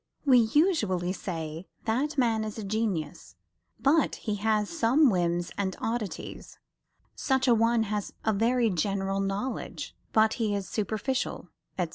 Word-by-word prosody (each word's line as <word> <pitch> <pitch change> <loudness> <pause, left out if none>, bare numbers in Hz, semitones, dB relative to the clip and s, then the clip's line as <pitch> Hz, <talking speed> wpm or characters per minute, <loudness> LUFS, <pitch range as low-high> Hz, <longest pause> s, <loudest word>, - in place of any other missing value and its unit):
We 260 -3 +7
usually 220 - +2
say 165 -2 -5 0.2
That 275 +7 0
man 230 -4 +2
is 215 0 -5
a 220 - -5
genius, 195 -7 -3 0.4
but 290 +2 +3
he 210 -2 -3
has 210 0 +1
some 280 -1 +3
whims 175 -1 0
and 190 -2 -1
oddities 225 -6 -4 0.6
Such 265 -1 +1
a 245 - +6
one 230 0 +3
has 210 -1 -3
a 220 - +3
very 230 +2 +2
general 195 +2 -1
knowledge, 195 +6 -3 0.2
but 220 0 +4
he 210 -2 +1
is 195 -2 -3
superficial, 220 +6 -2 0.3
etc. - - 0
220 Hz, 140 wpm, -28 LUFS, 195-240 Hz, 0.6 s, We